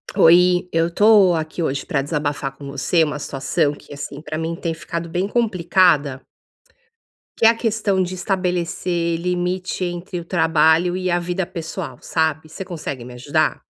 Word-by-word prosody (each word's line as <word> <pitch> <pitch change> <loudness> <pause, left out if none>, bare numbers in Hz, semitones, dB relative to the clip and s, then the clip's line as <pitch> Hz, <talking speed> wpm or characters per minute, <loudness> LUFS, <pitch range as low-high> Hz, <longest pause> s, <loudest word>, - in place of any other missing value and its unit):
Oi, 180 0 +5
eu 165 +1 +1
tô 205 0 +5
aqui 160 +1 -3
hoje 135 -4 -2
pra 150 -6 0
desabafar 145 -2 -3
com 140 - -11
você 155 +4 +2
uma 150 -1 -2
situação 145 +2 -1
que, 145 - -13
assim, 145 0 -7
pra 155 0 -5
mim 165 +1 -3
tem 165 0 -3
ficado 170 +1 -5
bem 180 +4 -1
complicada 180 - +2 1.2
que - - +4
é - - +10
a 230 - +3
questão 215 -4 0
de 185 0 -2
estabelecer 175 -2 -1
limite 180 +1 -2
entre 175 +1 -5
o 170 - -9
trabalho 165 +1 +3
e 185 -1 -1
a 175 - +2
vida 175 +2 -2
pessoal, 170 -1 -6
sabe. 160 -1 -1
Você 190 +4 -7
consegue 150 -8 -6
me 125 - -10
ajudar? 145 +5 0
170 Hz, 165 wpm, -21 LUFS, 155-180 Hz, 1.2 s, é